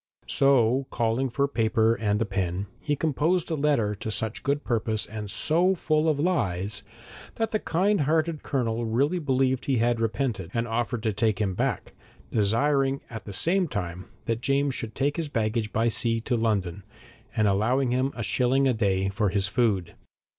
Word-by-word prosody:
So 135 -1 +3
calling 120 +3 0
for 140 +3 0
paper 115 -3 +2
and 105 -2 0
a - - -3
pen, 95 -1 -2
he 145 - -1
composed 160 +4 0
a - - +1
letter 140 -8 +1
to 105 +2 -6
such 110 0 -2
good 145 +1 -1
purpose 110 -2 -1
and 105 -1 -7
so 175 - +2
full 155 -2 +1
of 150 -2 0
lies, 105 - 0 0.5
that 225 -1 -1
the 215 - +1
kindhearted 165 -5 +1
Colonel 120 -4 -1
really 135 +10 +1
believed 130 -3 +1
he 135 -2 +1
had 115 0 +1
repented, 110 -5 -1
and 115 +1 0
offered 120 0 -2
to 110 -2 0
take 110 -1 +1
him 100 -3 0
back, 125 +2 -2 0.4
desiring 135 +6 +1
at 110 -3 -7
the 105 - -7
same 180 - +1
time 90 - -5 0.2
that 115 0 -1
James 140 +1 +1
should 115 -3 -5
take 145 +2 0
his 165 -3 -2
baggage 110 -3 -1
by 115 +2 +1
sea 115 0 +1
to 120 +2 -1
London, 100 -5 -1 0.5
and 110 -1 +3
allowing 120 +6 +2
him 130 +2 +1
a 115 - -4
shilling 130 +4 +2
a 130 - +3
day 95 -4 +1
for 100 +1 0
his 100 +1 +1
food. 105 -6 0
120 Hz, 175 wpm, -26 LUFS, 110-140 Hz, 0.5 s, So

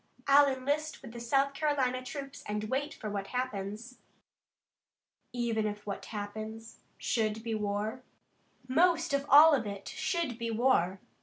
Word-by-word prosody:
I'll 280 +1 +7
enlist 285 +3 -2
with 240 - -9
the 235 - -8
South 275 +4 +1
Carolina 275 -4 0
troops 275 +1 -7
and 210 0 -2
wait 285 +3 -1
for 215 - -7
what 200 -1 -3
happens." 235 -1 -4 1.3
"Even 230 -3 0
if 210 0 -6
what 200 -1 -5
happens 220 +2 -7 0.2
should 220 -1 -1
be 230 -1 -2
war?" 210 +3 -2 0.7
"Most 330 +3 +3
of 280 0 0
all 300 +3 +9
if 260 -6 +1
it 200 -1 -6
should 330 -10 -2
be 230 0 -2
war. 215 -6 +2
240 Hz, 145 wpm, -31 LUFS, 215-275 Hz, 1.3 s, all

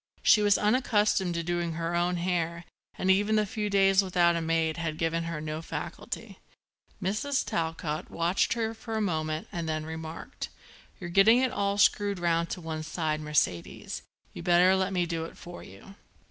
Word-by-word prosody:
She 210 - +6
was 205 -1 +4
unaccustomed 210 -5 +2
to 170 - -1
doing 175 0 -1
her 165 +1 -3
own 175 +1 +1
hair 170 -1 -1 0.3
and 190 - +2
even 205 +3 +3
the 215 0 +3
few 210 +1 -3
days 195 -1 +4
without 175 -2 +3
a 170 - -1
maid 160 0 0
had 165 -2 -3
given 165 0 -1
her 165 -2 -4
no 155 +1 -4
facility. - - -6 0.6
Mrs. 215 +9 -1
Talcott 160 -2 -3
watched 170 +3 +1
her 225 -1 -2
for 225 0 -6
a - - 0
moment 155 -5 -1
and 170 -2 -3
then 155 0 -2
remarked: 160 0 -7 0.5
"You're 175 -3 -6
getting 195 +6 +6
it 255 -1 +2
all 200 0 0
screwed 205 -1 +3
round 170 -1 +1
to 180 - -5
one 160 -1 -4
side, 155 -1 -2
Mercedes. 150 - -1 0.3
You'd 170 - -8
better 180 +1 +5
let 190 0 0
me 180 -2 +1
do 165 -1 -3
it - - -11
for 175 0 -10
you." 100 - -13
175 Hz, 180 wpm, -28 LUFS, 165-200 Hz, 0.6 s, She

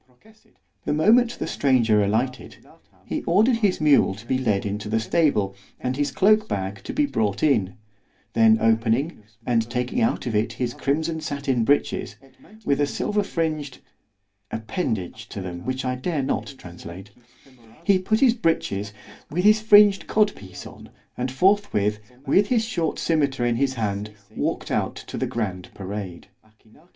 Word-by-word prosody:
The - - 0
moment 230 +10 +4
the - - -3
stranger 120 -9 +2
alighted, 120 +6 -2 0.5
he - - -3
ordered 220 +8 +3
his 205 -5 +1
mule 145 -10 +4
to 110 +3 -13
be 130 +2 0
led 105 -6 0
into 105 +1 -4
the 110 +1 +1
stable, 110 - +1 0.2
and 125 0 -2
his 145 +1 0
cloak 215 +5 +3
bag 95 0 -4
to - - -4
be 295 +1 +2
brought 110 - -1
in; 110 -11 +2 0.6
then 110 -1 +5
opening, 115 +7 +1 0.2
and 115 -2 +1
taking 125 - -1
out 230 +2 0
of 120 - -2
it 105 +1 0
his 120 -1 -3
crimson 160 +3 -1
sattin 140 -5 -1
breeches, 145 +5 0 0.5
with 140 +1 +1
a 145 - +2
silver 210 +7 -1
fringed—(appendage 110 - -5
to - - -6
them, 90 -2 -7
which 130 +1 -3
I 125 - 0
dare 145 +2 -2
not 135 +1 -3
translate)—he 115 - -5
put 215 +4 0
his 255 -4 +6
breeches, 110 - -1 0.4
with 175 +5 -1
his 215 +1 +5
fringed 205 -2 +6
cod 215 -1 +2
piece 95 -2 -11
on, - - -12 0.3
and 125 +1 -2
forth 195 +9 +2
with, 105 +1 0 0.3
with 195 +9 +3
his 230 -2 +1
short 175 -8 -2
scymetar 140 -6 0
in 120 -1 +1
his 135 0 0
hand, 105 -2 -3 0.2
walked - - -2
out - - -1
to - - -9
the - - -1
grand 95 -6 -4
parade. 95 -2 -6
130 Hz, 155 wpm, -23 LUFS, 105-165 Hz, 0.6 s, his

